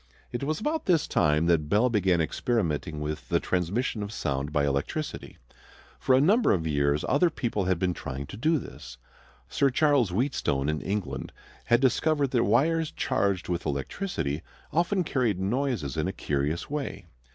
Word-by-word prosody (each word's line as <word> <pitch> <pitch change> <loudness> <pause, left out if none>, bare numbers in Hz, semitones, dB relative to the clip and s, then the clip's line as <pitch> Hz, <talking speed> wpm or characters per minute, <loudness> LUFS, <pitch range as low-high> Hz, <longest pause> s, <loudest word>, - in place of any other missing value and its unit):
It 120 - -4
was 155 +2 -1
about 310 +7 -2
this 170 -5 +3
time 75 +2 +2
that 80 -3 +2
Bell 105 +7 +4
began 95 -7 +2
experimenting 80 - -1
with 75 -5 -5
the - - +3
transmission 100 +6 -1
of 100 0 -4
sound 70 -6 -2
by 75 -2 +1
electricity. 70 - -3 0.6
For 130 - +3
a - - +5
number 205 - +4
of 85 -4 -1
years 70 -1 +1
other 150 +6 +3
people 115 - -2
had 95 -1 +1
been 90 +1 0
trying 70 -3 -6
to - - -9
do 155 +9 +2
this. 65 - -9 0.5
Sir 140 - +2
Charles 140 -4 +3
Wheatstone 90 - 0
in 75 -1 -1
England 90 -8 -3 0.3
had 120 +1 +3
discovered 140 +1 +2
that 120 -3 +2
wires 155 +9 +2
charged 100 -3 -1
with 90 -1 -2
electricity 75 - -3 0.3
often 175 +3 +2
carried 125 - 0
noises 105 - -1
in - - 0
a - - -1
curious 75 +3 -2
way. 140 -10 -4
100 Hz, 165 wpm, -27 LUFS, -, 0.6 s, a